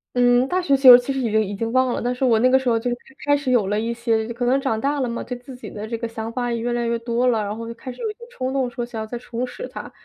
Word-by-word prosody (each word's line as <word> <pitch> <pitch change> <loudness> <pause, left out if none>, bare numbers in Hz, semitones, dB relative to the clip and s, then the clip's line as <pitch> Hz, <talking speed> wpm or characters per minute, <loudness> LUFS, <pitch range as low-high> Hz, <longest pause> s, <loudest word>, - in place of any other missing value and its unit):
嗯， 245 +1 +4
大 365 +4 0
学 280 -5 +2
就 260 -2 +10
其 245 +3 +1
实 270 - -2
已 235 -4 -1
经 220 0 +3
已 200 0 -5
经 225 +2 -3
忘 255 0 +2
了， - - -2
但 245 +1 -1
是 250 +2 -4
我 235 -3 +4
那 250 +3 +4
个 265 +1 +5
时 260 - -1
候 230 - +3
就 240 +2 -2 0.3
开 290 0 +4
始 280 -2 -2
有 240 -5 +3
了 210 +2 0
一 230 +1 -2
些 230 -2 0
可 245 - -2
能 265 +3 +2
长 225 -5 -1
大 285 +2 0
了 250 -3 -1
嘛， 235 - -4
对 250 - -5
自 250 +1 -11
己 250 - -9
的 215 +1 -6
这 230 0 -3
个 235 - -3
想 225 0 -6
法 245 0 -2
也 235 - -1
越 240 +1 -2
来 240 0 -1
越 235 0 0
多 235 +1 -1
了， 225 -3 +2
然 205 +1 -4
后 230 - -6
就 230 - -5
开 255 +2 -8
始 245 - -13
有 440 -2 -2
一 - - -11
些 430 - -45
冲 260 - -4
动， 265 -2 0
说 240 0 -4
想 230 -2 -6
要 220 - -5
再 240 +2 -5
重 240 0 -4
拾 - - -7
它。 - - -9
245 Hz, 375 characters per minute, -22 LUFS, 230-260 Hz, 0.3 s, 就